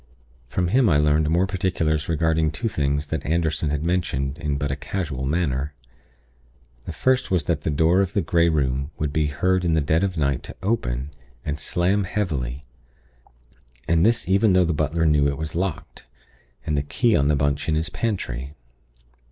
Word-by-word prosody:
From 90 +7 -1
him 125 +2 +4
I 75 - +4
learned 75 +1 +2
more 85 +4 +3
particulars 85 -6 -1
regarding 80 -1 +1
two 80 +10 -3
things 75 -6 -1
that 80 - -2
Anderson 80 -1 0
had 75 +1 -2
mentioned 80 -5 -1
in 75 -4 -1
but 70 0 -2
a - - -1
casual 75 -9 -4
manner. 75 -3 -1 1.1
The - - -5
first 130 0 +1
was 90 -5 +1
that 80 0 -1
the 80 - -2
door 80 +5 +3
of 95 0 -2
the 100 - +2
Grey 85 0 +2
Room 70 -3 0
would 75 -2 -2
be 75 0 +1
heard 90 +5 +1
in 85 -2 +2
the - - +3
dead 80 +4 +1
of 95 -3 -1
night 70 -4 0
to - - -10
open, 70 - -1 0.3
and 75 +1 -3
slam 95 +6 +1
heavily, 70 -10 -3 1.2
and 85 0 +3
this 115 -2 +2
even 100 +1 +3
though 90 -1 +4
the 85 - 0
butler 80 +2 0
knew 75 -2 +4
it 70 -1 -2
was 80 +1 -4
locked, 90 -2 -4 0.6
and 75 - 0
the 70 - +1
key 105 - +1
on 70 - +2
the 75 - +3
bunch 70 +1 0
in 80 - +2
his 80 +3 -1
pantry. 75 - -3
80 Hz, 185 wpm, -23 LUFS, 70-90 Hz, 1.2 s, him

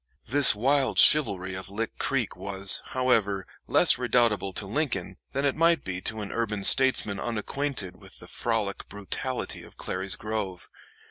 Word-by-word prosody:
This 140 -1 +5
wild 135 +5 0
chivalry 100 -11 +4
of 95 0 -7
Lick 110 +3 -5
Creek 135 -6 -2
was, 95 +1 +3
however, 110 -7 0 0.2
less - - +5
redoubtable 120 -5 +1
to 100 - -2
Lincoln 135 +7 -3
than 140 +1 -2
it 140 - 0
might 165 +1 +2
be 90 -1 -6
to 110 +2 -4
an 100 - -7
urban 105 -3 -3
statesman 125 -5 +4
unacquainted 115 -3 -4
with - - -15
the - - -12
frolic 110 -4 -3
brutality 120 +6 -5
of - - -16
Clary's 95 +1 -1
Grove. 105 -4 -6
110 Hz, 150 wpm, -26 LUFS, 100-130 Hz, 0.2 s, This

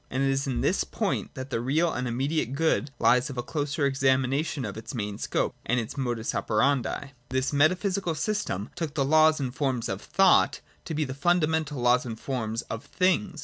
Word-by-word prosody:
And 130 +2 -1
it 135 - +2
is 135 +1 -1
in 130 - -1
this - - +2
point - - -3
that 130 +1 -7
the 115 - -1
real 155 +7 +1
and 125 +1 -2
imfflediate 135 +2 -1
good 155 -2 +1
lies 120 +3 +3
of 135 - -7
a 120 - -1
closer 145 +1 -1
examination 135 +1 +1
of 100 - -5
its 115 +4 -7
main 105 -3 -4
scope - - -1
and 125 - +1
its 115 - -5
modus 120 -5 -2
operandi. 130 +4 +1
28.] 140 0 -6 0.2
This 130 +2 -1
metaphysical 180 +4 +2
system 160 - -2
took 160 -4 -4
the 140 - +1
laws 155 +2 +5
and 130 -3 -3
forms 130 -5 -1
of 95 +1 -4
thought 195 -1 +4 0.3
to 160 - -4
be 155 0 0
the 130 - -5
fundamental 160 -1 +1
laws 125 +1 +4
and 110 -1 -6
forms 115 -4 -3
of 115 +1 -6
things. 185 +1 0
135 Hz, 200 wpm, -27 LUFS, 125-155 Hz, 0.3 s, laws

